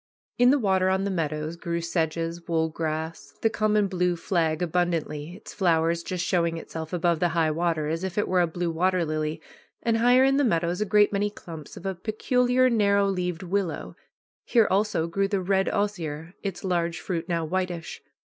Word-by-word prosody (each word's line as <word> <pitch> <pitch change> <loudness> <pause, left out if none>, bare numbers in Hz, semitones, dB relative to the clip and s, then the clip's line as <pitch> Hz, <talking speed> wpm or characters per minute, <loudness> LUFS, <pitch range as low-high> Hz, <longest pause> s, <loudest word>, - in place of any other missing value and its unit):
In 245 0 +6
the 285 - +5
water 190 -6 +2
on 190 +1 +1
the 200 - -1
meadows 155 -2 -2
grew 170 0 -3
sedges, 165 0 -2
wool 160 -1 +1
grass, 160 0 -4
the 225 - +3
common 215 -1 +2
blue 180 -2 0
flag 165 -2 0
abundantly, 170 -2 -1
its - - -11
flower 165 -4 +2
just 170 +1 -3
showing 170 -2 +1
itself 160 -1 -7
above 170 -2 +1
the 175 - +2
high 160 -1 +3
water, 165 -1 0
as 165 +3 -2
if 190 0 -4
it 205 - +1
were 185 -1 +3
a 175 - +2
blue 170 +1 -2
water 180 +1 +1
lily, 155 0 -2 0.4
and 230 -1 +2
higher 245 +3 +5
in 270 +1 +4
the 285 - +3
meadows 175 -4 +1
a - - +2
great 210 0 +4
many 205 +1 +1
clumps 165 -7 -10
of 180 - -10
a 195 - -1
peculiar 250 +6 +1
narrow 200 -4 +3
leaved 180 -2 -2
willow. 185 -1 -2 0.5
Here 230 -4 +3
also 200 -4 +1
grew 195 +4 0
the 200 -1 0
red 190 +1 +1
osier, 175 -6 -3
its 195 -3 -5
large 170 -2 0
fruit 175 -1 -4
now 165 -2 0
whitish. 180 -1 -3
175 Hz, 190 wpm, -26 LUFS, 165-200 Hz, 0.5 s, In